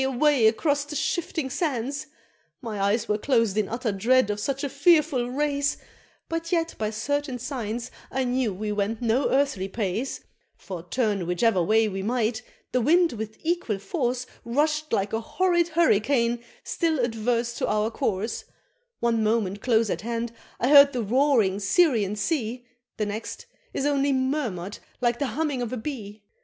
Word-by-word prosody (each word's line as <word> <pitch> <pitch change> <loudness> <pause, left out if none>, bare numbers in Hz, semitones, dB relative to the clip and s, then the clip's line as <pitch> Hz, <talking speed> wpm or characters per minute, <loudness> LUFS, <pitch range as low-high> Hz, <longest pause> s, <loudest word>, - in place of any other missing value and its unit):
away! 265 -2 +3
across 285 +6 +1
the 295 +1 -7
shifting 320 -1 -1
sands! 280 0 -2 0.5
My 220 -6 -5
eyes 205 +3 +1
were 210 0 0
closed 230 -5 +2
in 215 -2 0
utter 235 0 -1
dread 225 +3 +3
of 205 - -3
such 275 +6 -2
a - - +1
fearful 285 -4 +3
race, 285 +1 0 0.5
But 330 0 -3
yet 330 -2 +1
by 215 -1 0
certain 270 +5 -2
signs 240 -2 -4 0.2
I 265 - -1
knew 250 -2 0
we 210 +3 -4
went 210 +2 -1
no 235 +4 +2
earthly 265 -9 +1
pace, 215 +5 -3 0.3
For 185 -3 -7
turn 200 -1 -1
whichever 185 +2 +2
way 220 +5 +3
we 195 -2 -3
might, 225 +1 0 0.3
the 250 - +1
wind 340 +5 +4
with 220 -1 -6
equal 330 - 0
force 250 - -2 0.2
Rush'd 305 +5 0
like 200 -2 0
a 225 - 0
horrid 345 +6 +1
hurricane 240 -6 +2 0.2
still 330 -2 0
adverse 235 0 0
to - - 0
our 215 +1 +1
course 215 0 -2 0.6
One 230 -2 +2
moment 210 -3 0
close 225 -3 +2
at - - -2
hand 230 +1 -3 0.3
I 250 - +1
heard 280 -1 +8
the 245 -2 -1
roaring 230 -4 +3
Syrian 210 - +3
Sea, 245 +1 -2 0.3
The 215 - 0
next 210 +2 -5 0.3
is 275 - -2
only 280 -1 +2
murmur'd 260 - -2 0.2
like 240 -1 +1
the 280 - 0
humming 295 -5 0
of 240 - -3
a 255 - -3
bee! 220 -5 -6
240 Hz, 165 wpm, -25 LUFS, 215-280 Hz, 0.6 s, heard